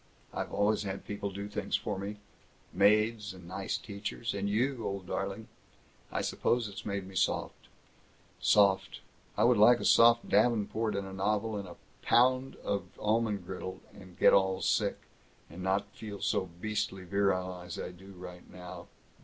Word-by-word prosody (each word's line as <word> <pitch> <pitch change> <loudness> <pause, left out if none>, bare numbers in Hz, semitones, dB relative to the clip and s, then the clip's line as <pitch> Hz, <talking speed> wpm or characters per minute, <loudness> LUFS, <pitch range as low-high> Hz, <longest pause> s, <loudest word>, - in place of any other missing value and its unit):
I've - - -3
always 105 +1 +2
had 100 -1 -5
people 100 0 -4
to 95 - -12
do 100 +1 -4
things 105 - -2
for - - -2
me. 100 +2 -5 0.6
Maids 105 +1 +3
and 90 -2 -12
nice 95 +2 -3
teachers 100 +2 -5
and 100 0 -2
you, 120 +3 0
old 100 -2 -3
darling! 100 +4 -3 0.6
I - - -1
suppose 120 -2 +1
it's 100 0 -8
made 100 -2 -2
me 95 - -11
soft. 95 - -1 0.7
Soft 95 -2 +3 0.4
I - - +3
would 120 -2 +5
like 120 +3 +7
a - - -4
soft 120 0 +6
davenport 110 0 +2
and 100 0 -2
a 95 - -8
novel 105 +3 0
and 100 -2 -4
a 85 - -10 0.3
pound 130 +2 +3
of 100 -1 -1
almond 105 -3 0
brittle, 95 +1 -6
and 95 -3 -14
get - - +6
all 95 -1 +3
sick, - - +1 0.5
and 85 +2 -8
not 95 +2 0
feel 105 -2 -7
so 95 - 0
beastly 105 -2 -2
virile 95 -1 0
as 90 -1 -7
I - - -5
do 95 +1 -14
just 90 -1 -10
now. 90 -1 -9
100 Hz, 170 wpm, -31 LUFS, 95-110 Hz, 0.7 s, like